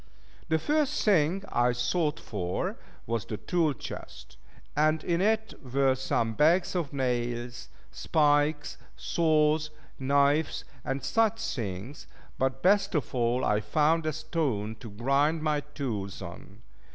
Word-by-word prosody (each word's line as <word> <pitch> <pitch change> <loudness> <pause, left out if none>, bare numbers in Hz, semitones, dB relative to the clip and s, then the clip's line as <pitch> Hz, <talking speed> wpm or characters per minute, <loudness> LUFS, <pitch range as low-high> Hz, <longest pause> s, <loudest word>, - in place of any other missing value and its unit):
The 160 - +3
first 295 - 0
thing, 190 -1 +3
I 120 +1 +3
sought 150 +6 0
for 90 - -3 0.3
was 115 -2 -1
the 105 - -5
tool 165 - +1
chest; 65 - -9 0.4
and 155 +1 +2
in 170 0 0
it 220 +2 +1
were 135 +1 +2
some 120 -3 -1
bags 165 - +3
of 170 -6 -2
nails, 120 -2 -2 0.2
spikes, 145 - +1 0.2
saws, 155 - +2 0.3
knives, 140 +3 +2 0.2
and 135 0 -3
such 225 +8 +2
things: 110 +3 -6 0.3
but 130 0 0
best 200 0 +3
of 145 -6 -1
all 120 0 +1
I 105 0 +2
found 155 +9 +2
a 155 - 0
stone 145 -9 -2
to 115 - -9
grind 140 +9 +1
my 150 -1 +1
tools 130 -10 -5
on. 95 +5 -11
140 Hz, 130 wpm, -28 LUFS, 120-160 Hz, 0.4 s, The